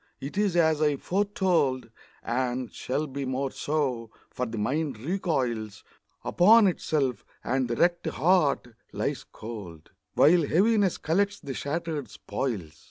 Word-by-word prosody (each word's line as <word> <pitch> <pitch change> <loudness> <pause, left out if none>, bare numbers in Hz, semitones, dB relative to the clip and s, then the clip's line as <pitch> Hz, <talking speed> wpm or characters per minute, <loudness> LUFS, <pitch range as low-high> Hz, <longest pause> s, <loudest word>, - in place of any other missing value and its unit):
it 140 - -7
is 200 -3 +1
as 160 -3 +3
I 150 -2 +3
foretold, 175 - 0 0.3
And 125 0 -2
shall 145 +4 -2
be 140 -1 -5
more 130 +1 -2
so; 135 -7 -2 0.2
for 125 - -3
the 115 0 -6
mind 135 +4 -1
recoils 125 - -2 0.4
Upon 215 +5 +6
itself, 145 - 0 0.2
and 130 -1 0
the 120 - -2
wrecked 175 +5 +2
heart 160 -8 +2 0.2
lies - - -2
cold, 100 -9 -9 0.2
While 170 +4 +6
Heaviness 195 +5 +2
collects 200 +5 0
the 140 - -6
shattered 155 +1 -3
spoils. 100 - -4
145 Hz, 130 wpm, -27 LUFS, 125-175 Hz, 0.4 s, Upon